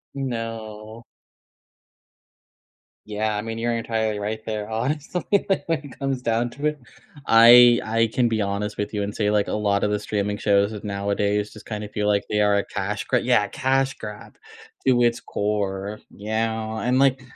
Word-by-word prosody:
No. 115 -3 -5 2.0
Yeah, 105 0 -2
I 105 - -2
mean 115 0 -5
you're 120 0 -1
entirely 110 -2 -1
right 105 +2 -3
there 105 -1 -4
honestly, 145 +9 -2 0.3
like, 195 - +1
when 165 -2 +1
it 140 - -12
comes 135 -2 -2
down 115 +1 0
to 145 +4 -2
it. 150 -1 -2 0.5
I 120 +1 +8
I 115 +1 +1
can 120 -2 +2
be 110 -1 0
honest 100 +1 -2
with 105 +1 -3
you 105 -1 -1
and 105 +1 -4
say, 105 -1 0
like, 105 -1 +1
a - - -2
lot 100 -1 +1
of 105 - +1
the 105 - 0
streaming 105 -1 -2
shows 100 +1 +2
nowadays 100 +1 -1
just - - -13
kind 105 -1 -5
of 105 - -8
feel 105 0 -1
like 100 -1 +2
they 105 - 0
are 105 -1 +3
a 100 - 0
cash 105 +1 -3
gr 125 - +1
Yeah, 120 -4 +2
cash 135 0 0
grab 105 -1 -9 0.5
to 125 -2 +4
its 120 0 +2
core. 100 0 -3 0.2
Yeah, 110 +1 -2
and 125 +1 +1
like, 135 -1 +3
110 Hz, 180 wpm, -23 LUFS, 105-120 Hz, 2.0 s, I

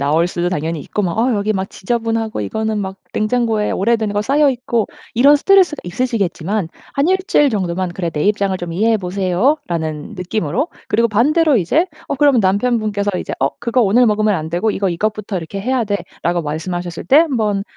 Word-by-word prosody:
나올 155 +4 +2
수도 175 0 -2
당연히 160 -2 -2
있고 205 +9 -3
뭐 175 -3 -1
어 240 +4 +1
여기 205 +1 0
막 190 -1 -3
지저분하고 225 - -2
이거는 220 - -2
막 190 -1 -5 0.2
냉장고에 220 -1 0
오래된 220 0 0
거 205 - 0
쌓여 280 +6 +3
있고 245 -3 -1 0.3
이런 280 +5 +6
스트레스가 370 -2 +4
있으시겠지만 200 -2 -1 0.3
한 280 - +1
1 380 +1 +3
주일 295 - +4
정도만 185 -3 -2
"그래 175 0 -3
내 150 -1 -2
입장을 200 -2 +1
좀 175 -2 -5
이해해 220 +5 +2
보세요."라는 180 - -1
느낌으로 185 - -2 0.2
그리고 230 +2 +3
반대로 290 +7 +3
이제 285 - +1 0.2
어 - - -1
그러면 280 -3 +4
남편분께서 205 0 +1
이제 - - -5
"어 135 +1 +2
그거 240 +1 +1
오늘 230 +4 +4
먹으면 215 -1 +2
안 160 -2 -3
되고 180 +6 0
이거 195 -1 -1
이것부터 210 +3 -2
이렇게 180 +4 -5
해야 250 +1 0
돼."라고 175 -4 -2
말씀하셨을 170 +3 -4
때 265 - +4
한번 220 -11 +1
210 Hz, 420 characters per minute, -18 LUFS, 180-235 Hz, 0.3 s, 이런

